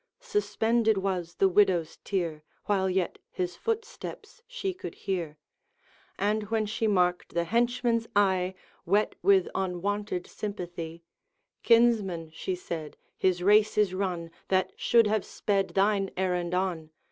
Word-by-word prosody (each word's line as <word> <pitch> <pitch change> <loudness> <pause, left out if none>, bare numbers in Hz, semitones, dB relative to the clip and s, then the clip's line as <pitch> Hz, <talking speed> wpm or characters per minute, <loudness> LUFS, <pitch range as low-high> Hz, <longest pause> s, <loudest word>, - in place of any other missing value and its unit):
Suspended 235 - +1
was 185 -3 -2
the 195 - +4
widow's 185 -4 +2
tear 170 -6 -2 0.2
While 190 -2 +1
yet 185 -1 -1
his 180 -1 -3
footsteps 455 - -5
she 480 -7 -3
could 370 - -8
hear; 170 -6 -3 0.8
And 210 +1 0
when 220 -1 +1
she 220 +1 -1
marked 180 -4 +1
the 170 - +2
henchman's 235 +3 +1
eye 190 -2 +2 0.3
Wet 205 +4 +2
with 195 -2 +4
unwonted 190 +1 -2
sympathy, 175 -5 -6 0.6
'Kinsman,' 215 -9 +3
she 185 - -3
said, 165 -4 -6 0.2
'his 180 -1 +1
race 210 +2 +4
is 205 -3 +3
run 180 -3 -2 0.2
That 185 -1 +1
should 235 -2 +4
have 210 -1 +1
sped 195 -2 0
thine 195 0 +2
errand 180 -2 0
on. 180 -4 -1
195 Hz, 130 wpm, -28 LUFS, 180-215 Hz, 0.8 s, the